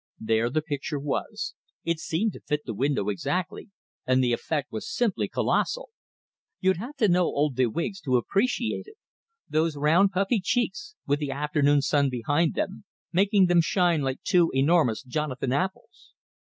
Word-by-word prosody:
There 110 Hz, +1 st, +1 dB
the 155 Hz, +4 st, -1 dB
picture 145 Hz, -1 st, -3 dB
was; 140 Hz, 0 st, -3 dB, 0.3 s
it 170 Hz, -1 st, -1 dB
seemed 170 Hz, +6 st, -1 dB
to -, -, -10 dB
fit 150 Hz, 0 st, -2 dB
the 115 Hz, -, -4 dB
window 130 Hz, -2 st, 0 dB
exactly, 175 Hz, -, -3 dB, 0.4 s
and 130 Hz, 0 st, +3 dB
the 120 Hz, -1 st, +2 dB
effect 145 Hz, +4 st, -2 dB
was 110 Hz, -, -5 dB
simply 235 Hz, -6 st, 0 dB
colossal. -, -, 0 dB, 0.7 s
You'd 190 Hz, -2 st, +2 dB
have 245 Hz, +10 st, -7 dB
to 230 Hz, -6 st, +2 dB
know 180 Hz, -1 st, +3 dB
old 145 Hz, -3 st, 0 dB
de 130 Hz, -1 st, +3 dB
Wiggs 170 Hz, -, -3 dB
to 130 Hz, -4 st, +2 dB
appreciate 225 Hz, -, -1 dB
it 430 Hz, -, -14 dB, 0.5 s
those 155 Hz, -1 st, 0 dB
round, 165 Hz, +7 st, +4 dB
puffy 195 Hz, +4 st, +1 dB
cheeks, 245 Hz, -, -1 dB
with 145 Hz, +1 st, +1 dB
the 145 Hz, -2 st, -3 dB
afternoon 145 Hz, 0 st, +2 dB
sun 140 Hz, -1 st, +2 dB
behind 145 Hz, +6 st, 0 dB
them, 195 Hz, +1 st, -3 dB, 0.3 s
making 195 Hz, +2 st, +4 dB
them 175 Hz, -1 st, +4 dB
shine 170 Hz, -2 st, +2 dB
like 135 Hz, -1 st, -3 dB
two 175 Hz, -4 st, +3 dB
enormous 135 Hz, -4 st, +3 dB
Jonathan 135 Hz, -1 st, -2 dB
apples! 185 Hz, +7 st, -4 dB
155 Hz, 165 wpm, -26 LUFS, 135-190 Hz, 0.7 s, round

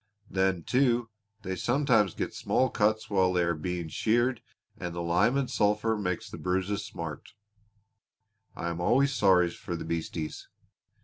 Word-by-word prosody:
Then, 95 Hz, -2 st, +1 dB
too, 120 Hz, -, +2 dB, 0.3 s
they 95 Hz, -1 st, -3 dB
sometimes 120 Hz, -, +2 dB
get -, -, -3 dB
small 130 Hz, -2 st, +1 dB
cuts 110 Hz, +1 st, +1 dB
while 95 Hz, -2 st, +2 dB
they 90 Hz, -1 st, +2 dB
are 85 Hz, 0 st, +1 dB
being 85 Hz, +1 st, -3 dB
sheared 120 Hz, +8 st, +1 dB, 0.3 s
and 85 Hz, -1 st, -6 dB
the 85 Hz, -, -3 dB
lime 85 Hz, +10 st, +2 dB
and 140 Hz, -2 st, 0 dB
sulphur 105 Hz, +1 st, +1 dB
makes 90 Hz, -4 st, -2 dB
the -, -, -9 dB
bruises 95 Hz, +3 st, -1 dB
smart. 85 Hz, -7 st, -7 dB, 1.2 s
I 85 Hz, 0 st, -3 dB
am 85 Hz, +1 st, -4 dB
always 135 Hz, +9 st, +3 dB
sorry 90 Hz, -7 st, +4 dB
for 85 Hz, -, -6 dB
the 85 Hz, -, -6 dB
beasties. 80 Hz, -1 st, -4 dB
95 Hz, 150 wpm, -28 LUFS, 85-115 Hz, 1.2 s, sorry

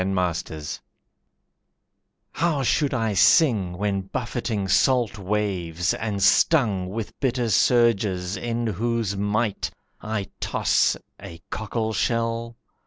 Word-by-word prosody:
Storm 95 Hz, +1 st, -1 dB
Racked 85 Hz, -4 st, -3 dB, 1.5 s
How 155 Hz, -3 st, 0 dB
should 140 Hz, +3 st, +1 dB
I 115 Hz, -5 st, 0 dB
sing 100 Hz, -, +4 dB
when 100 Hz, 0 st, -1 dB
buffeting 110 Hz, 0 st, -3 dB
salt 120 Hz, +2 st, +2 dB
waves 95 Hz, -4 st, -1 dB
And 105 Hz, -3 st, -2 dB
stung 100 Hz, -, +3 dB
with 110 Hz, +2 st, -6 dB
bitter 125 Hz, -3 st, 0 dB
surges, 100 Hz, -5 st, +2 dB
in 120 Hz, 0 st, -2 dB
whose 115 Hz, 0 st, -1 dB
might 105 Hz, +2 st, -1 dB, 0.3 s
I 105 Hz, -3 st, -4 dB
toss, -, -, +1 dB, 0.2 s
a 85 Hz, -1 st, -9 dB
cockleshell? 115 Hz, +2 st, -2 dB
105 Hz, 105 wpm, -24 LUFS, 95-115 Hz, 1.5 s, sing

